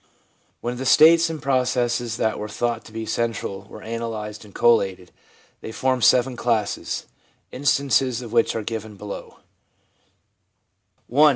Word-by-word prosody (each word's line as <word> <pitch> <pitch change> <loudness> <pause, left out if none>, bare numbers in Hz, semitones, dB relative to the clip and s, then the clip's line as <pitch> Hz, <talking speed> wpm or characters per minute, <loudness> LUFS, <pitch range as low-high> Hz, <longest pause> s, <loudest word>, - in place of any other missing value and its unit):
When 120 +1 -3
the 130 - -4
states 165 +4 +6
and 160 -1 -5
processes 125 -3 0
that 110 -2 0
were 105 - -4
thought 120 +1 -2
to - - -13
be 110 0 -5
central 110 -4 -3
were - - -11
analysed 110 -2 -5
and 105 - -15
collated, 95 -6 +2 0.5
they - - -7
formed 130 +1 0
seven 125 +2 +4
classes, 115 -4 -1 0.5
instances 135 -2 +1
of 115 -1 -9
which 115 -1 +2
are 110 - -2
given 110 -1 -5
below: 100 0 -9 0.8
— 120 - -23
I. 150 +1 +7
115 Hz, 145 wpm, -23 LUFS, 110-130 Hz, 0.8 s, I